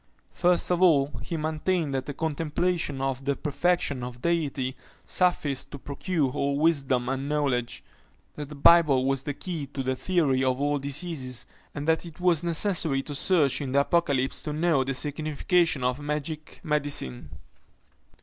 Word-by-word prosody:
First 180 0 +2
of 180 0 +1
all, 145 -6 +4
he 170 - -4
maintained 155 0 -1
that 135 -1 -2
the 145 - -4
contemplation 160 -1 -1
of 135 -1 -2
the 140 0 0
perfection 150 -2 0
of 125 0 -8
the - - +2
Deity 140 -5 -2 0.3
sufficed 145 -7 0
to - - -8
procure 145 +1 -2
all 140 +2 -1
wisdom 140 -6 +2
and 135 +2 -2
knowledge; 135 -5 -1 0.5
that 145 -2 -6
the 150 - -8
Bible 145 -3 +5
was 135 0 +1
the 145 0 -4
key 165 -5 -5
to 135 -1 -5
the 130 0 -1
theory 140 -5 +1
of 130 0 +1
all 145 0 +1
diseases, 140 -3 -3 0.3
and 145 +1 -4
that 160 0 +2
it 170 0 -11
was 175 -2 +2
necessary 165 -5 +1
to 145 - -7
search 150 -2 +3
into 135 -2 -4
the 140 - +5
Apocalypse 140 -4 +1
to 150 - -4
know 155 -3 +2
the 135 0 -3
signification 155 +1 0
of 125 +2 0
magic 150 +1 -4
medicine. 145 - -2
145 Hz, 165 wpm, -26 LUFS, 135-165 Hz, 0.5 s, Bible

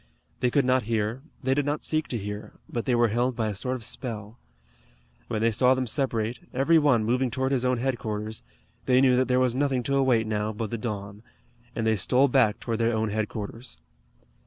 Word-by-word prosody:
They 125 - +2
could 140 +1 +2
not 130 0 +3
hear, 110 +2 -1 0.2
they 130 +1 +2
did 145 +1 0
not 145 +1 -1
seek 155 -1 0
to 120 - -3
hear, 105 0 -6
but 120 - -4
they 125 - +2
were 120 -1 +3
held 120 +3 0
by 110 -2 -1
a 105 - -4
sort 125 +7 -2
of 125 - -7
spell. 110 -1 -6 0.9
When 110 0 -2
they 115 - +3
saw 125 +4 +4
them 130 0 -1
separate, 120 -2 -1 0.2
every 160 +6 +4
one 135 -7 +3
moving 125 +3 +1
toward 130 +2 -1
his 130 -2 +1
own 125 0 +2
headquarters, 110 -4 -3 0.5
they 125 0 +5
knew 130 -1 +5
that 130 +1 +2
there 125 0 +2
was 130 -2 +2
nothing 130 -1 0
to 140 +3 0
await 130 -5 +3
now 105 0 -1
but 110 0 -4
the 115 - -2
dawn, 100 -3 -5 0.5
and 110 - -1
they 110 0 +3
stole 130 +8 +3
back 120 -5 +3
toward 115 -1 -3
their 115 0 +2
own 110 0 0
headquarters. 110 +2 -4
120 Hz, 210 wpm, -26 LUFS, 110-130 Hz, 0.9 s, they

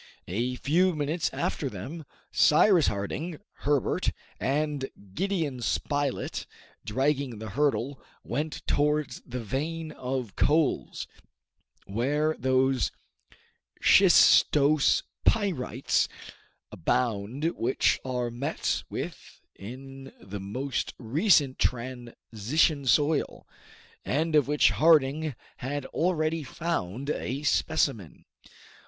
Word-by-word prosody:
A 120 +8 -1
few 175 +7 +2
minutes 155 +2 -1
after 140 - -2
them, 135 - -7 0.3
Cyrus 170 +2 +5
Harding, 145 - -3 0.2
Herbert, 145 -3 +1 0.3
and 145 0 -1 0.2
Gideon 160 - -1
Spilett, 145 +2 -2 0.4
dragging 135 +1 0
the 110 -1 -7
hurdle, 140 -1 0 0.2
went 150 +5 -4
towards 150 -2 0
the 125 -1 -5
vein 155 +7 -3
of 125 -6 -4
coals, 155 -2 +1 0.8
where 145 +9 0
those 130 0 +2 0.9
shistose 150 0 +5 0.2
pyrites 165 - +1 0.6
abound 120 - -1
which 125 +3 +1
are 125 -2 -2
met 140 +7 -2
with - - -7 0.2
in 135 +5 -10
the 95 +2 -7
most 125 +8 -3
recent 140 - +2
transition 125 +3 -1
soil, 150 +3 +1 0.6
and 160 +4 0
of 145 -3 +4
which 150 0 +4
Harding 155 -2 +3 0.2
had 140 +2 -4
already 165 -2 0
found 140 - -3
a 135 +1 -3
specimen. 150 - 0
140 Hz, 90 wpm, -27 LUFS, 125-155 Hz, 0.9 s, Cyrus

